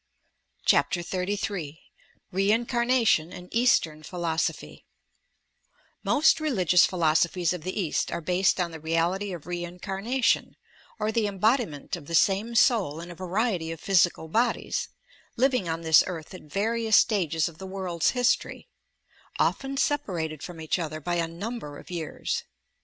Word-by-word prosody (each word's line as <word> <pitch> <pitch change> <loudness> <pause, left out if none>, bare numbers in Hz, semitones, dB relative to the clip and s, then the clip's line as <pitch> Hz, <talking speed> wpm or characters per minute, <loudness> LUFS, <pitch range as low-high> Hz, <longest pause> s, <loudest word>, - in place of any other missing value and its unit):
CHAPTER 175 - +3
XXXm 185 -4 -3 0.6
REIKCARNATION 230 -2 +2
AND 180 0 -11
EASTERN 225 - +2
PHILOSOPHY 165 0 -3 1.2
Most 305 +2 +4
rBligious 185 - +3
philosophies 170 0 +1
of 180 - -6
the 185 +5 -4
East 170 -6 -1
are - - -2
based 180 +3 +1
on 175 -2 0
the 160 - -8
reality 170 +5 0
of 170 -5 -7
reincarnation, 190 +8 -1 0.4
or 215 0 -1
the 220 -1 +1
embodiment 205 - 0
of 155 -5 -11
the 165 - -2
same 205 +7 +2
soul 210 - +3
in 170 +1 -8
a - - -9
variety 185 -1 -1
of 165 - -7
physical 175 -3 +2
bodies, 230 +9 0 0.5
living 250 -7 +2
on 165 +1 -2
this 160 -1 +6
earth 165 -3 -6
at 185 - -9
various 225 +3 +2
stages 165 -8 +2
of 170 -1 -11
the 190 - -7
world's 185 -3 -1
history, 245 -1 0 0.7
often 270 0 0
separated 175 - -1
from 175 -2 -8
each 160 +3 -1
other 155 -2 -4
by 175 +4 -3
a 165 -1 0
number 170 -3 -6
of - - -13
years. 165 -3 -3
180 Hz, 140 wpm, -26 LUFS, 165-220 Hz, 1.2 s, this